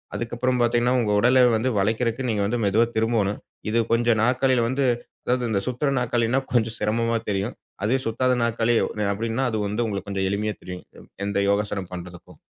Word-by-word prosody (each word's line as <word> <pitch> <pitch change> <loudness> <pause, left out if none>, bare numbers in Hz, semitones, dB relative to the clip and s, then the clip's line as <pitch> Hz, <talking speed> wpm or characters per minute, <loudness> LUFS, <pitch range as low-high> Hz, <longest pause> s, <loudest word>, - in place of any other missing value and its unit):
அதுக்கப்றம் 120 +2 -1
பாத்தீங்கன்னா, 120 +1 +2
உங்க 105 -3 0
உடலை 125 +3 +5 0.2
வந்து 120 +4 0
வளைக்கிறதுக்கு 115 +5 0
நீங்க 105 -3 0
வந்து 120 +4 -1
மெதுவா 105 +4 +3
திரும்பனும். 110 -3 +1 0.3
இது 115 - +2
கொஞ்சம் 115 -1 +2
நாற்காலில 125 0 +2
வந்து, 135 +2 0 0.4
அதாவது 125 -1 0
இந்த 100 - +2
சுத்துற 125 +3 0
நாற்காலின்னா 120 +1 +1
கொஞ்சம் 115 -2 +1
சிரமமா 115 +2 +1
தெரியும். 100 +4 -2 0.3
அது 110 +5 +2
சுத்தாத 125 +3 +1
நாற்காலி 115 0 +1 0.4
அப்டின்னா, 115 +5 -1
அது 110 - -1
வந்து 105 +4 -1
உங்களுக்கு 100 -2 -4
கொஞ்சம் 95 -1 -1
எளிமையா 105 +1 -1
தெரியும். 90 0 -7 0.4
எந்த 100 0 -2
யோகாசனம் 100 -2 -1
பண்றதுக்கும். 90 -1 -10
115 Hz, 165 wpm, -24 LUFS, 105-120 Hz, 0.4 s, உடலை